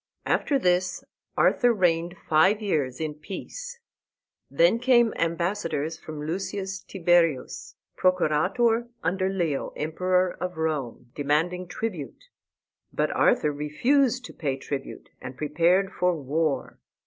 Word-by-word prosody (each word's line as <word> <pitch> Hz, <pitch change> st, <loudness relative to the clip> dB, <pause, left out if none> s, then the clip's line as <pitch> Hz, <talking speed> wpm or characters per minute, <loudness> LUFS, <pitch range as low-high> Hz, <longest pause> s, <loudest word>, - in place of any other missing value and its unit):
After 285 Hz, -, +1 dB
this 180 Hz, -5 st, +1 dB, 0.3 s
Arthur 245 Hz, -1 st, +4 dB
reigned 175 Hz, -4 st, +1 dB
five 190 Hz, +7 st, +4 dB
years 150 Hz, -, -1 dB
in 155 Hz, -1 st, -2 dB
peace. 480 Hz, -, -8 dB, 0.7 s
Then -, -, +3 dB
came 240 Hz, -2 st, +4 dB
ambassadors 165 Hz, -2 st, -1 dB
from 150 Hz, -1 st, -7 dB
Lucius 195 Hz, +3 st, -3 dB
Tiberius, 170 Hz, -8 st, 0 dB, 0.2 s
Procurator 185 Hz, +7 st, +2 dB, 0.2 s
under 185 Hz, +3 st, 0 dB
Leo, 170 Hz, -7 st, -1 dB
Emperor 180 Hz, +4 st, 0 dB
of 180 Hz, -2 st, -4 dB
Rome, 140 Hz, -7 st, -3 dB
demanding 165 Hz, +5 st, 0 dB
tribute. 180 Hz, -, -6 dB, 0.6 s
But -, -, 0 dB
Arthur 150 Hz, -, +3 dB
refused 245 Hz, -, +1 dB
to -, -, -10 dB
pay 140 Hz, -4 st, -2 dB
tribute, 135 Hz, 0 st, -6 dB
and 130 Hz, 0 st, -8 dB
prepared 170 Hz, +6 st, +2 dB
for 180 Hz, -1 st, +1 dB
war. 145 Hz, 0 st, -2 dB
175 Hz, 110 wpm, -26 LUFS, 150-195 Hz, 0.7 s, Arthur